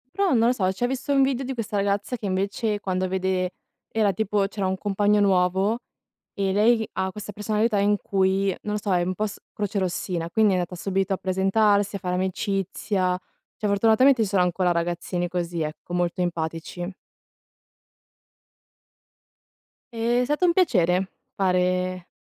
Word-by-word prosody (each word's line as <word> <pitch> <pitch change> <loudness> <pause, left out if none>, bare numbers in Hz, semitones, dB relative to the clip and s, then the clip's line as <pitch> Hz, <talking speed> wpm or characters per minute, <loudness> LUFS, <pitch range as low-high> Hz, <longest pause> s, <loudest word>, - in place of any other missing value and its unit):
Però, 395 -4 +2
non 230 -1 +4
lo - - +4
so, 190 -7 0
cioè, 190 - -5
ho - - +1
visto 265 +2 -2
un 275 - +4
video 265 -1 0
di 265 - -3
questa 225 -4 -3
ragazza 200 +4 0
che 220 - -7
invece 200 +3 -1
quando 185 -1 -1
vede 185 -1 -1 0.4
era 215 -3 +2
tipo, 205 +1 0
c'era 200 -2 -2
un 190 0 -1
compagno 205 +1 +2
nuovo 190 +3 +2 0.5
e 195 -1 -1
lei 220 +3 +3
ha 190 0 -1
questa 210 0 -7
personalità 210 +1 0
in 205 +1 +3
cui, 195 0 +1
non 210 - -3
lo - - -1
so, 200 -2 0
è 175 -1 +2
un 185 +1 -1
po' 215 - -1
s 205 - -9
crocerossina, 185 -4 -2
quindi 215 +3 +3
è - - +2
andata 180 0 -3
subito 195 +2 -1
a - - -1
presentarsi, 200 +2 +2
a 200 - -3
fare 180 -2 -2
amicizia. 190 0 -1 0.4
Cioè, 210 - -2
fortunatamente 225 +5 +4
ci - - -1
sono 190 -2 +3
ancora 180 0 +1
ragazzini 175 +1 -2
così 170 -1 -3
ecco, 155 +3 -5
molto 175 +1 -1
empatici. 170 +1 -3 3.0
E, 235 +2 +1
è - - +2
stato 295 +7 +1
un 345 - +4
piacere 190 - +2 0.2
fare 185 -1 0
195 Hz, 165 wpm, -24 LUFS, 185-215 Hz, 3.0 s, non